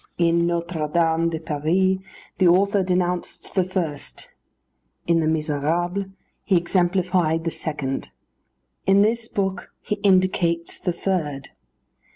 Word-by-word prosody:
In 170 0 +3
Notre 170 -2 -2
Dame 165 0 +2
de 160 -1 -3
Paris 170 +5 +1 0.4
the 185 - +5
author 200 +3 +4
denounced 180 -1 -2
the 190 - +3
first; 175 -6 -5 0.7
in 170 -1 +3
the 160 - +1
Misérables 160 +5 -1 0.3
he 190 - +3
exemplified 175 -2 +1
the 165 - -1
second; 145 -5 -3 0.8
in 195 +1 +6
this 225 +1 0
book 195 -4 -2
he 210 - -3
indicates 185 -4 +1
the 180 - -1
third. 165 -6 -2
175 Hz, 120 wpm, -23 LUFS, 160-190 Hz, 0.8 s, in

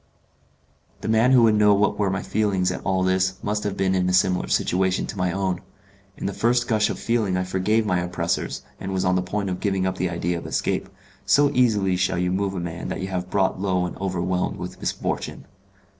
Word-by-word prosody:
The - - -5
man 110 +3 +4
who 125 -3 +6
would 110 -1 +5
know 105 -1 +5
what 105 +1 +1
were 100 -2 +2
my 95 0 -2
feelings 95 -4 0
at - - -5
all 95 -1 +1
this 95 0 +1
must 105 0 -1
have 105 -2 -3
been 95 -1 +1
in 90 -1 +1
a - - 0
similar 95 0 +2
situation 95 +1 +1
to - - -7
my 90 -2 0
own. 95 -1 -1 0.6
In - - -6
the 100 - -1
first 120 +3 +1
gush 110 -3 +2
of - - -3
feeling 110 -6 0
I 90 - 0
forgave 95 +4 +1
my 90 -4 +1
oppressors, 90 0 -2 0.2
and 95 0 -4
was 95 0 0
on 90 - +3
the 90 - +2
point 100 +1 -2
of 90 - -3
giving 95 -2 0
up 95 0 -2
the 90 - 0
idea 85 0 -2
of - - -8
escape; - - -1 0.3
so 145 +1 +4
easily 105 -7 +2
shall 90 -1 0
you 90 0 0
move 95 +1 -1
a - - -2
man 85 0 -5
that - - -4
you 95 - -3
have 90 -1 -3
brought 95 -1 +1
low 90 -2 +1
and 90 - -5
overwhelmed 90 -1 -1
with - - -7
misfortune. - - -3
95 Hz, 225 wpm, -23 LUFS, 90-105 Hz, 0.6 s, who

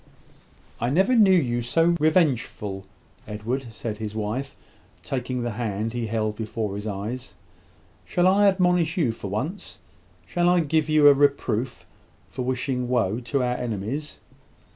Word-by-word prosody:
"I 120 - 0
never 190 - +3
knew 210 -4 +6
you 125 -10 +2
so 165 +8 +2
revengeful, 130 - +1 0.4
Edward," 115 +5 -3
said 110 -1 -5
his 110 -1 -5
wife, 110 +6 -3 0.5
taking 125 -1 -3
the 120 - -2
hand 110 0 -3
he 120 -2 -2
held 110 -1 -1
before 110 -2 -3
his 105 +2 -5
eyes. 105 +1 -5 0.7
"Shall 175 - 0
I 200 +2 +5
admonish 180 -3 +2
you 145 -10 +2
for 110 - -7
once? 130 - -4 0.5
Shall 175 - +1
I 180 -1 +4
give 155 0 0
you 155 -1 +6
a 145 - +9
reproof 135 -4 0 0.5
for - - -5
wishing 125 0 -2
woe 115 -3 +1
to 125 +2 -1
our 125 0 0
enemies? 120 +7 -4
125 Hz, 145 wpm, -24 LUFS, 110-155 Hz, 0.7 s, a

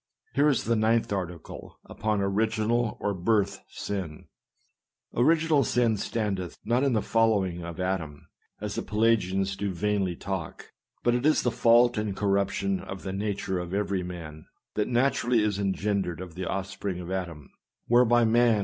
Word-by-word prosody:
Here 145 +2 +4
is 135 - +1
the 115 - +1
9th 110 -1 +2
article, 90 -4 -6
upon 105 -2 -1
Original 110 +3 0
or 105 - -1
Birth 100 +2 +1
Sin: 90 -7 -5 0.4
" - - -48
Original 160 -1 +4
Sin 120 -3 +2
standeth 100 -4 -3
not 120 +4 +2
in 140 -3 +2
the 110 - +1
following 100 -6 +1
of 85 0 -7
Adam; 90 -6 -3 0.3
(as 105 -1 -4
the - - -2
Pelagians 100 -3 +1
do 100 0 -2
vainly 95 -1 0
tails 95 -3 -4 0.3
;) - - -48
but 120 - +3
it 120 +1 0
is 155 +1 +3
the 125 - +1
fault 120 0 +4
and 105 -2 -3
cor 100 0 0
ruption 100 -1 0
of 95 -1 -7
the 95 - -4
nature 100 -2 -2
of 90 +2 -4
every 100 -2 0
man, 85 -4 -8 0.3
that 105 - 0
naturally 120 -2 +2
is 105 -2 0
engendered 100 -3 -1
of 90 -2 -8
the 90 +2 -5
offspring 95 -1 -3
of 90 0 -7
Adam; 85 -6 -5 0.3
whereby 120 0 +4
man - - +2
244 120 +1 +5
SERMONS. - - 0
100 Hz, 175 wpm, -27 LUFS, 95-115 Hz, 0.4 s, 244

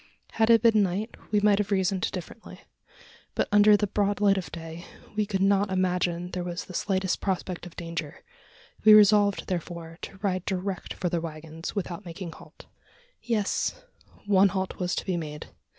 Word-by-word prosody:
Had 225 0 +2
it 230 -1 +6
been 220 -2 +5
night, 200 +4 -1 0.2
we 210 - +3
might 205 -1 +4
have 205 -1 -1
reasoned 190 -1 +1
differently; 185 +5 -9 0.8
but, - - +1
under 210 0 +7
the 210 - 0
broad 205 0 0
light 200 -1 +4
of 190 -2 -4
day, 165 +1 -8 0.3
we 210 -1 0
could 195 -2 0
not 200 0 +3
imagine 180 -1 0
there 180 - -3
was 175 0 -5
the 185 - -11
slightest 190 -1 -1
prospect 185 -2 -3
of 175 - -14
danger. 165 -3 -6 0.6
We 215 -1 +9
resolved, 205 -1 +5
therefore, 170 -2 -5
to 195 - -8
ride 185 -3 0
direct 190 -1 -3
for 180 - -2
the 170 -1 -1
waggons, 160 +1 -7
without 185 -1 -4
making 170 0 -7
halt. - - -15 0.6
Yes 230 - -1 0.4
one 200 -1 +5
halt 190 0 -3
was 180 0 -1
to - - -3
be 185 -3 -1
made. 150 -2 -6
190 Hz, 175 wpm, -27 LUFS, 175-205 Hz, 0.8 s, We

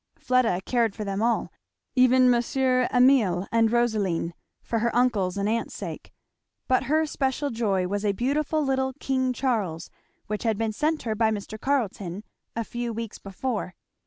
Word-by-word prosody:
Fleda 250 -8 +2
cared 235 -4 +1
for 215 - -4
them 195 0 -2
all, 235 +1 0 0.4
even 255 0 +5
Monsieur 255 +1 +2
Emile 245 -8 +4
and 225 -1 +3
Rosaline, 210 -8 +1 0.3
for 230 - -1
her 235 +2 +1
uncle's 210 -7 +2
and 200 0 0
aunt's 230 +2 -1
sake; - - -7 0.6
but 255 - +2
her 310 +2 +2
special 280 -1 -1
joy 200 -6 0
was 200 +2 -2
a 205 - +2
beautiful 290 +7 0
little 265 -1 0
King 260 -1 0
Charles 215 -11 -2 0.3
which 210 0 -3
had 225 -3 0
been 225 0 -1
sent 305 +6 0
her 225 - -1
by 220 +1 +2
Mr. 215 0 -4
Carleton 210 -8 -1 0.3
a 230 - -1
few 240 +1 -4
weeks 225 -1 -6
before. 195 -1 -4
230 Hz, 160 wpm, -26 LUFS, 205-255 Hz, 0.6 s, even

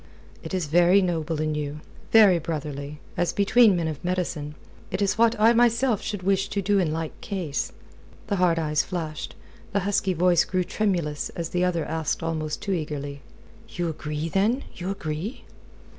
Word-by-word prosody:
"It - - -8
is 180 -3 0
very 175 +5 +5
noble 165 -4 -1
in 155 0 0
you 150 0 -3 0.3
very 205 -6 +7
brotherly, 150 -2 -5 0.2
as 175 - +1
between 205 +1 +5
men 170 -2 0
of 155 +1 -5
medicine. 175 -5 -2 0.3
It 190 - -3
is 200 -1 +1
what 230 0 +3
I 225 +2 +6
myself 235 -1 +3
should 205 -3 -4
wish 195 0 +1
to 200 - -2
do 200 +1 +2
in 170 -5 +1
like 160 0 -4
case." 180 - -3 0.5
The 200 - -1
hard 175 -2 +3
eyes 150 -2 +1
flashed, 160 -5 -5 0.4
the 200 - +2
husky 195 -1 +1
voice 175 +1 +4
grew 185 -1 0
tremulous 175 -6 -1
as 165 -1 -3
the 180 0 0
other 170 -3 0
asked 160 +1 -2
almost 155 -2 -3
too 200 - -2
eagerly: 145 -4 -4 0.5
"You 175 -1 -2
agree, 150 0 -4
then? 210 - +1
You 180 +1 -4
agree?" 195 - -4
175 Hz, 175 wpm, -25 LUFS, 155-195 Hz, 0.5 s, very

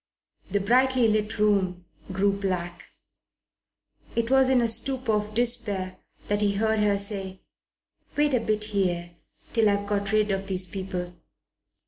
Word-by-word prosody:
The 205 - 0
brightly 250 +3 +3
lit 215 0 0
room 190 -4 +1 0.3
grew 200 +2 +1
black. 180 -3 -4 1.3
It 235 +1 -1
was 265 -1 +5
in 260 -1 +4
a 235 - +2
stupor 245 +2 +2
of 210 0 -2
despair 200 -6 0 0.3
that 205 0 0
he 205 -1 +2
heard 220 +1 +1
her 205 -1 +2
say, 195 -2 -2 0.7
"Wait 295 -1 +2
a 250 - +3
bit 215 -1 -1
here, 180 -5 -1 0.4
till 225 -3 +3
I've 200 0 0
got 200 0 -1
rid 215 -1 +2
of 195 0 -2
these 185 -1 +1
people." 180 -1 -5
205 Hz, 145 wpm, -26 LUFS, 190-225 Hz, 1.3 s, was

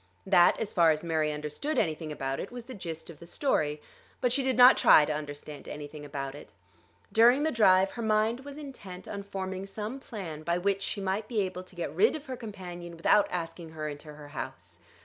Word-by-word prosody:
That, 175 - +5
as 225 - -3
far 170 -2 +5
as 155 0 +1
Mary 160 -2 +1
understood 150 - -3
anything 155 -1 0
about 135 -2 -3
it, - - -5
was 245 -1 -7
the 255 +2 -9
gist 170 -5 -7
of 155 - -15
the 170 - -12
story. 155 - 0 0.4
But 250 -2 +1
she 275 +3 +2
did 260 -1 0
not 250 +1 +9
try 150 - +7
to 155 - -1
understand 145 0 -7
anything 150 0 -7
about 140 -2 -5
it. 145 -7 -12 0.6
During 240 +5 +6
the 315 - +2
drive 195 -5 +5
her 235 - -6
mind 220 +2 +2
was 280 +1 -9
intent 205 -11 -9
on 200 - -5
forming 190 -1 -5
some 215 +6 -5
plan 185 - -7
by 170 +2 0
which 195 +2 0
she 200 - -3
might 195 +3 -1
be 225 -4 0
able 185 -1 -3
to 185 0 -16
get 175 - -4
rid 440 -3 +4
of 305 -1 -7
her 260 -2 -5
companion 180 -7 -8
without 200 +5 +4
asking 170 -1 -5
her 155 -1 -4
into 150 +1 -7
her 145 -1 -11
house. 90 - -8
185 Hz, 215 wpm, -29 LUFS, 155-225 Hz, 0.6 s, not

